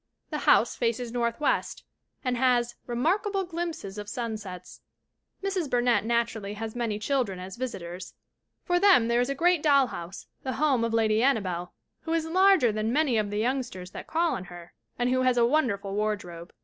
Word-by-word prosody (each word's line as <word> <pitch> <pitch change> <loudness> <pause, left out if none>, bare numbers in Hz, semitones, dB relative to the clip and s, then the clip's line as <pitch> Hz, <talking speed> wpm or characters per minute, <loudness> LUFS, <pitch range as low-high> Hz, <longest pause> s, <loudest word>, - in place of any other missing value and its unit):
The - - -2
house - - +4
faces 235 0 -1
northwest 235 +3 -1 0.4
and 250 -1 +1
has 240 -1 +2
"remarkable 385 - 0
glimpses 330 - -5
of 205 0 -7
sun 230 -1 -3
sets." 185 -4 -9 0.6
Mrs. 380 -6 -1
Burnett 240 -4 +2
naturally 230 -3 -1
has 220 +1 -6
many 230 -3 -1
children 215 -3 -1
as 185 +1 -8
visitors. 185 -8 -6 0.5
For 355 -1 +1
them 360 - +5
there 235 +1 +3
is 245 - -1
a 275 - -1
great 345 +2 +3
doll 280 -3 +5
house, 180 -6 -8 0.2
the 260 - -3
home 270 -2 +2
of 230 - 0
Lady 220 -1 +2
Annabelle, 185 -9 0 0.3
who 325 - -3
is 330 -1 0
larger 370 - +4
than 215 +1 -1
many 275 -4 +2
of 210 -1 -1
the 205 - -3
youngsters 230 -6 -2
that - - -8
call 335 +1 +1
on 185 - -4
her, 175 -1 -12 0.2
and 245 0 +1
who 255 0 +2
has 255 -1 +2
a 235 - +5
won 300 +3 +3
derful 200 -2 -4
wardrobe. 200 -5 -3
235 Hz, 185 wpm, -27 LUFS, 210-275 Hz, 0.6 s, them